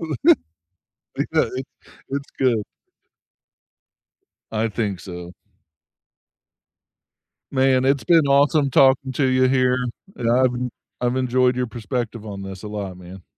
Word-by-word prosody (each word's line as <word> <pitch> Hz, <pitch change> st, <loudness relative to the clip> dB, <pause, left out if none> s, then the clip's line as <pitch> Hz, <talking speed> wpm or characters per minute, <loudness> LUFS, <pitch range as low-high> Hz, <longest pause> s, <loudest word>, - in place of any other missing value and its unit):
I 155 Hz, -6 st, +3 dB, 1.0 s
know -, -, +3 dB
it's 130 Hz, -, -2 dB, 0.5 s
it's 140 Hz, +1 st, -4 dB
good. 120 Hz, -5 st, +2 dB, 1.9 s
I 110 Hz, +1 st, 0 dB
think 105 Hz, -4 st, -2 dB
so. 90 Hz, -1 st, -8 dB, 2.2 s
Man, 130 Hz, -1 st, +3 dB
it's 135 Hz, 0 st, +2 dB
been 165 Hz, -4 st, +4 dB
awesome 140 Hz, +1 st, +3 dB
talking 135 Hz, 0 st, +4 dB
to 135 Hz, -, +1 dB
you 130 Hz, 0 st, +3 dB
here, 130 Hz, -1 st, +2 dB, 0.4 s
and 115 Hz, -1 st, -1 dB
I've 125 Hz, +1 st, +3 dB
en 125 Hz, +1 st, -3 dB, 0.3 s
I've 125 Hz, +1 st, 0 dB
enjoyed 125 Hz, 0 st, +2 dB
your 125 Hz, -1 st, -1 dB
perspective 115 Hz, 0 st, -4 dB
on 100 Hz, -2 st, -6 dB
this 95 Hz, -1 st, -8 dB
a 105 Hz, -, -5 dB
lot, 100 Hz, -3 st, -5 dB
man. 90 Hz, 0 st, -12 dB
125 Hz, 125 wpm, -22 LUFS, 105-130 Hz, 2.2 s, been